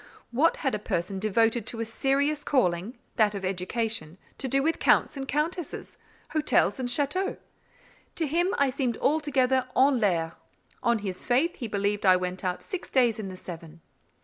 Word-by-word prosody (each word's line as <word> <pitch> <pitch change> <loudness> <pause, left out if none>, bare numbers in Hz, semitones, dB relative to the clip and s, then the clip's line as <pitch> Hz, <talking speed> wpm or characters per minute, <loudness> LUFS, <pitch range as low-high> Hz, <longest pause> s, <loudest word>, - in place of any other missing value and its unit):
What 290 +8 +3
had 265 - +2
a 210 - -1
person 190 -1 -2
devoted 225 +2 +1
to 230 - -2
a 230 - -1
serious 280 +6 0
calling, 195 -3 0 0.2
that 210 -3 +3
of 195 -1 -4
education, 185 -2 -2 0.2
to 270 - -2
do 275 +2 +2
with 325 +2 +1
Counts - - +3
and 270 -1 -5
Countesses, 305 +4 -3 0.3
hotels 295 - +2
and 250 -1 -1
châteaux? 290 +9 0 0.8
To 325 - 0
him, 345 +6 +1
I 280 -2 +3
seemed 255 -3 -1
altogether 265 -4 +2
'en 265 -1 +5
l'air.' 170 -6 +1 0.5
On 235 -2 +2
his 195 -3 -5
faith, 275 +8 +1
he 240 - -4
believed 205 0 -1
I 185 -2 +7
went 180 +1 -3
out 180 -1 -2
six 375 -3 -5
days 240 -4 +3
in 200 -3 -4
the 185 - -8
seven." 165 -2 -9
235 Hz, 175 wpm, -27 LUFS, 195-280 Hz, 0.8 s, I